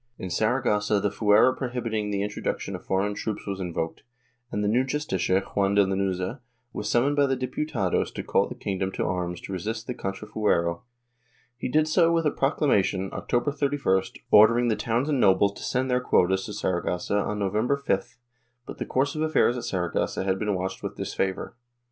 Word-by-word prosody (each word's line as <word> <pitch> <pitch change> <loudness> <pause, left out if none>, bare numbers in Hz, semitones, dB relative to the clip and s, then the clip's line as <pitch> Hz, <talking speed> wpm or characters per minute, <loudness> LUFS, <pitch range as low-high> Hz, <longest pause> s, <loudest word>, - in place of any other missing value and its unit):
In 95 - -6
Saragossa 105 -1 +1
the 100 0 0
fuero 105 +5 +4
prohibiting 115 -5 -2
the 100 -1 -1
introduction 105 0 -3
of - - -9
foreign 100 +2 0
troops 105 +1 -4
was 100 -1 -4
invoked, 85 -3 -3 0.5
and 105 - -1
the - - +1
new 120 +5 +3
Justicia, 130 -9 0
Juan 100 0 0
de 100 -1 +5
Lanuza, 95 +4 -1 0.3
was 105 0 -3
summoned 135 +5 +2
by 145 -1 +3
the 135 - +1
Diputados 130 - -1
to - - -4
call - - +2
the - - -7
king 95 -2 -4
dom 95 0 -1
to - - -1
arms 90 -1 -2
to 95 - -7
resist 110 +5 -4
the 125 - -3
contrafuero. 95 -5 -1 0.7
He 125 - -4
did 155 +4 +3
so 165 +1 +4
with 165 -1 +1
a 150 - +3
procla 135 +2 -1
mation, 95 -5 +1
October 120 +4 0
31st, 140 -10 0 0.2
ordering 115 +3 +6
the 110 - +2
towns 120 +6 -1
and 145 -4 +1
nobles 100 -1 +4
to - - -10
send 130 +1 -1
their 125 0 +2
quotas 95 -5 +2
to 105 - -6
Saragossa 95 0 -1
on 105 +1 -2
November 105 +7 +1
5th, 140 - -2 0.5
but - - -9
the - - -3
course 140 +2 +1
of 155 - -3
affairs 155 -6 +3
at 125 - -4
Saragossa 90 0 -1
had 95 0 0
been 105 -1 0
watched 95 +1 -4
with - - -5
disfavor. 95 +2 -3
105 Hz, 190 wpm, -26 LUFS, 95-125 Hz, 0.7 s, ordering